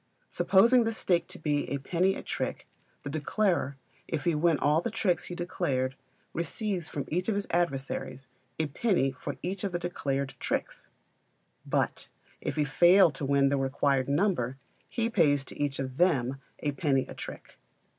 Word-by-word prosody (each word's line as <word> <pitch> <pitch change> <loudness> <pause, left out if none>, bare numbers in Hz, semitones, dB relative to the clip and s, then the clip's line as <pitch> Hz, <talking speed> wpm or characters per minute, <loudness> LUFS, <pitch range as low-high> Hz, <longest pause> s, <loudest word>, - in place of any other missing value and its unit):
Supposing 235 +6 +5
the 225 0 -1
stake 175 -5 +1
to - - -8
be 150 -2 -1
a 140 - -1
penny 180 +7 +1
a - - -7
trick, - - -4 0.4
the - - -4
declarer, 155 -2 0 0.3
if 160 -3 -2
he 170 - +2
win 160 +1 +3
all 150 +3 +3
the 235 - -2
tricks 200 -5 0
he 175 - -6
declared, 140 -7 -1 0.4
receives 175 +1 -2
from 140 -3 -4
each 180 +5 -1
of 215 - +1
his 200 0 -1
adversaries 135 -5 -1 0.3
a 160 - +1
penny 150 - +1
for 130 - -6
each 185 +2 -3
of 195 -3 -2
the - - +1
declared 140 -6 -2
tricks; - - -3 0.8
but - - 0 0.3
if 145 - -3
he 150 -1 +2
fail 175 +5 +6
to 140 +1 -7
win 140 0 +3
the 140 - +1
required 135 0 +1
number, 140 - +1 0.3
he 230 -2 0
pays 150 -11 +3
to - - -11
each 145 -2 0
of 130 -1 -4
them 135 -7 +2 0.2
a 145 - 0
penny 140 -2 +1
a - - -8
trick. - - -9
155 Hz, 175 wpm, -29 LUFS, 140-180 Hz, 0.8 s, fail